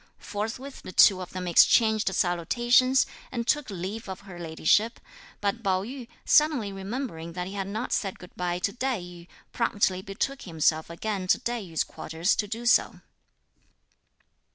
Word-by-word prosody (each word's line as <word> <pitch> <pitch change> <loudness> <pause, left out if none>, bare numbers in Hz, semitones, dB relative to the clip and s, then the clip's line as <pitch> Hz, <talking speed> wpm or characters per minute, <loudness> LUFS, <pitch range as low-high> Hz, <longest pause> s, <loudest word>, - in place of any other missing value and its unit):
Forthwith 230 +6 -5
the - - -8
two 185 0 +6
of 180 - -7
them 180 -1 -5
exchanged 220 +4 +5
salutations, 240 +10 +3 0.3
and 235 -2 -3
took 295 +1 +1
leave 195 +3 -5
of 190 - -6
her 190 -3 -11
ladyship; 170 +7 +1 0.4
but 205 +3 -1
Pao 190 -3 +1
yü, 250 +2 -7 0.2
suddenly 285 -10 +3
remembering 195 -5 -5
that 180 0 -4
he 190 - -7
had 195 -1 -3
not 220 +5 -3
said 195 -2 -1
good 180 - -14
bye 175 -1 -1
to 195 +2 -1
Tai 255 -2 -1
yü, 175 -1 -11 0.3
promptly 200 -5 +1
betook 215 +8 -3
himself 160 -2 0
again 190 +2 -3
to - - +4
Tai 240 -1 -3
yü's 165 -5 -1
quarters 165 +4 -1
to 210 - -1
do 230 +3 -5
so. 240 - +3
200 Hz, 160 wpm, -27 LUFS, 180-235 Hz, 0.4 s, two